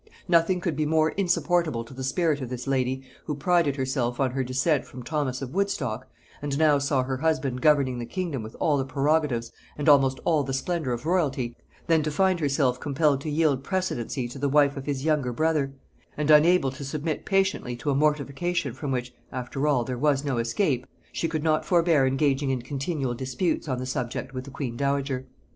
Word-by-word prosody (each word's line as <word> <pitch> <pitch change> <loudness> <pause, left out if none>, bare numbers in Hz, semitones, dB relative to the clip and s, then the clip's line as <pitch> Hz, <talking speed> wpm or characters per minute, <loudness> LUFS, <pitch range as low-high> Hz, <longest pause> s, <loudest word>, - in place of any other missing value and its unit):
Nothing 175 +1 +3
could 170 -3 -1
be 155 0 0
more 155 0 +3
insupportable 175 -8 +1
to 115 - -13
the 130 +1 -6
spirit 145 +2 +1
of 125 - -4
this 125 -1 -5
lady, 130 -1 0 0.2
who 150 - -2
prided 160 -1 +2
herself 130 -3 -1
on 135 -2 +2
her 135 +1 -1
descent 135 +3 +1
from 125 -1 -10
Thomas 135 -1 -2
of 130 +1 -6
Woodstock, 140 - -1 0.3
and 145 -1 -2
now 150 -2 +4
saw 140 -2 +1
her 130 0 -2
husband 140 -4 0
governing 140 -4 +3
the 120 - -5
kingdom 175 -9 -3
with 110 +1 -9
all 150 -3 +2
the - - +1
prerogatives 135 -3 0 0.3
and 145 - -3
almost 135 -3 +5
all 160 -3 +3
the 135 -1 -2
splendor 155 -1 -2
of 120 +2 -3
royalty, 140 -9 0 0.3
than 165 -2 +3
to 155 - -1
find 185 +4 +2
herself 140 -4 +1
compelled 145 0 +1
to 155 - -4
yield 145 -3 +1
precedency 140 - -2
to 135 - -8
the 140 +1 0
wife 145 0 +4
of 135 0 -7
his 140 -1 -2
younger 150 -5 +1
brother; 155 0 +1 0.5
and 150 0 +2
unable 155 -2 +5
to 135 +2 -8
submit 150 +3 -3
patiently 190 -11 0
to 120 +4 -2
a - - +1
mortification 150 +1 0
from 135 +2 -4
which, 125 -1 -2 0.2
after 130 +3 -3
all, 135 -5 +3
there 125 0 -4
was 145 -1 +2
no 135 -4 0
escape, 125 - 0 0.2
she 165 - -1
could 155 -2 -2
not 155 -1 +2
forbear 165 -6 +3
engaging 135 +1 +1
in 130 -2 -1
continual 135 0 -2
disputes 130 +8 -2
on 130 -3 -1
the 130 - -4
subject 130 0 -3
with 130 0 -5
the - - -9
queen 130 -3 -4
dowager. 140 -1 -1
140 Hz, 200 wpm, -26 LUFS, 130-155 Hz, 0.5 s, almost